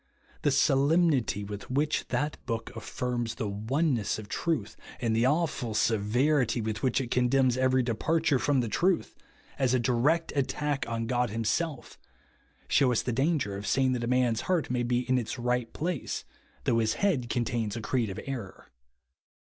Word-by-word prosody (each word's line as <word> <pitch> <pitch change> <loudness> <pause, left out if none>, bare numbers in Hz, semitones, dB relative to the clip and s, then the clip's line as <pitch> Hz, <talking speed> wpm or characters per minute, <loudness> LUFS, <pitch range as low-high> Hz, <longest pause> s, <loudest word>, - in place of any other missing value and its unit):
The - - +2
solemnity 140 - +3
with 105 0 -7
which 145 +4 0
that 145 +4 -2
book 115 -1 -4
affirms 120 0 -3
the 110 - -3
one 130 +10 0
ness 110 -5 -1
of 110 -1 -8
truth, 165 +6 -2 0.2
and 115 -3 0
the 115 +3 +3
awful 140 -7 0
seyerity 120 +4 +2
with 110 -1 -3
which 130 -1 +1
it 125 -3 -4
condemns 125 0 +3
every 130 0 +2
departure 145 +5 +1
from 140 -1 +2
the 120 - -2
truth, 180 - +1 0.5
as 130 -2 +3
a - - +2
direct 130 +8 +1
attack 145 +1 -1
on 115 0 -2
God 125 0 0
himself, 120 +7 -2 0.7
shew 130 -3 +3
us 120 - +1
the 125 - -2
danger 135 -5 0
of 100 +2 -6
saying 130 -1 +2
that 125 -2 -1
a - - -1
man's 125 -2 +2
heart 170 -9 0
may 125 -1 0
be 120 0 0
in 130 0 +3
its 120 +2 -4
right 125 -1 -1
place 170 -2 -3 0.4
though 115 - +2
his 110 -1 +1
head 150 -13 0
contains 120 -4 -1
a - - -3
creed 115 0 0
of 95 - -5
error. 120 -8 -7
125 Hz, 175 wpm, -28 LUFS, 115-140 Hz, 0.7 s, solemnity